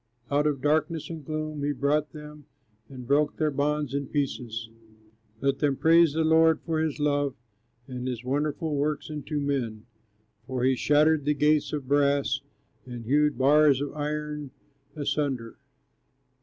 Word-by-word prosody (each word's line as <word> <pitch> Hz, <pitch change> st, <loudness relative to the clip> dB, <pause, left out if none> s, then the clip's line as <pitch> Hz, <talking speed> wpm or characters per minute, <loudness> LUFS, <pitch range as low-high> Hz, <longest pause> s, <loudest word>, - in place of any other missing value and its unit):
Out 145 Hz, +1 st, +2 dB
of 140 Hz, -3 st, -2 dB
darkness 155 Hz, +2 st, 0 dB
and 160 Hz, -2 st, -7 dB
gloom 155 Hz, 0 st, -4 dB
he 145 Hz, +1 st, 0 dB
brought 145 Hz, +2 st, 0 dB
them, 150 Hz, -1 st, -11 dB, 0.4 s
And 130 Hz, -2 st, -9 dB
broke 145 Hz, +3 st, +1 dB
their 155 Hz, -1 st, +1 dB
bonds 145 Hz, 0 st, -1 dB
in 140 Hz, -1 st, -2 dB
pieces. 120 Hz, -6 st, -3 dB, 0.7 s
Let 140 Hz, 0 st, 0 dB
them 145 Hz, -2 st, +1 dB
praise 165 Hz, -1 st, +5 dB
the 160 Hz, +1 st, +1 dB
Lord 160 Hz, 0 st, +4 dB
for 160 Hz, -1 st, -2 dB
his 155 Hz, -2 st, -1 dB
love, 145 Hz, -2 st, 0 dB, 0.5 s
And 125 Hz, -1 st, -5 dB
his 125 Hz, -2 st, -4 dB
wonderful 150 Hz, +4 st, -1 dB
works 150 Hz, +2 st, -2 dB
unto 150 Hz, 0 st, -4 dB
men! 125 Hz, -6 st, -2 dB, 0.6 s
For 130 Hz, -2 st, -2 dB
he 130 Hz, 0 st, +3 dB
shattered 150 Hz, +2 st, +3 dB
the 150 Hz, 0 st, +2 dB
gates 150 Hz, 0 st, +2 dB
of 145 Hz, -4 st, -4 dB
brass, 140 Hz, 0 st, +2 dB, 0.5 s
And 120 Hz, -2 st, -7 dB
hewed 150 Hz, +2 st, +2 dB
bars 145 Hz, +1 st, +5 dB
of 145 Hz, 0 st, -4 dB
iron 150 Hz, -1 st, -4 dB, 0.5 s
asunder. 140 Hz, -5 st, -2 dB
145 Hz, 150 wpm, -27 LUFS, 135-150 Hz, 0.7 s, praise